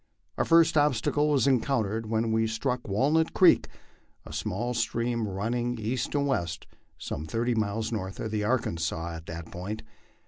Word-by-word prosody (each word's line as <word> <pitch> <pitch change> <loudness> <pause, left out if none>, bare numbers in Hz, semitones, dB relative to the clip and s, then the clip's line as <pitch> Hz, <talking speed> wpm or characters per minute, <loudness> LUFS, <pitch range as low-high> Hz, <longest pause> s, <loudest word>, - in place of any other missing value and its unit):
Our - - 0
first 165 0 +5
obsta 145 -7 +2
cle 150 +1 +2
was 140 -3 +3
encountered 115 -5 +1
when 110 0 +1
we 110 0 +2
struck 125 +3 -2
Walnut 145 +11 +2
creek, - - +6 0.6
a - - -9
small 120 +6 -2
stream 115 -1 -1
running 120 +5 -2
east 115 +5 -2
and 140 -1 +2
west 85 - -1 0.3
some 75 - -5
thirty 120 +8 0
miles 110 0 -1
north 95 -4 -4
of 110 - -3
the 105 -1 -1
Arkansas 85 -8 -1
at 80 - -12
that 80 0 -7
point. 105 +5 -5
115 Hz, 165 wpm, -28 LUFS, 100-125 Hz, 0.6 s, creek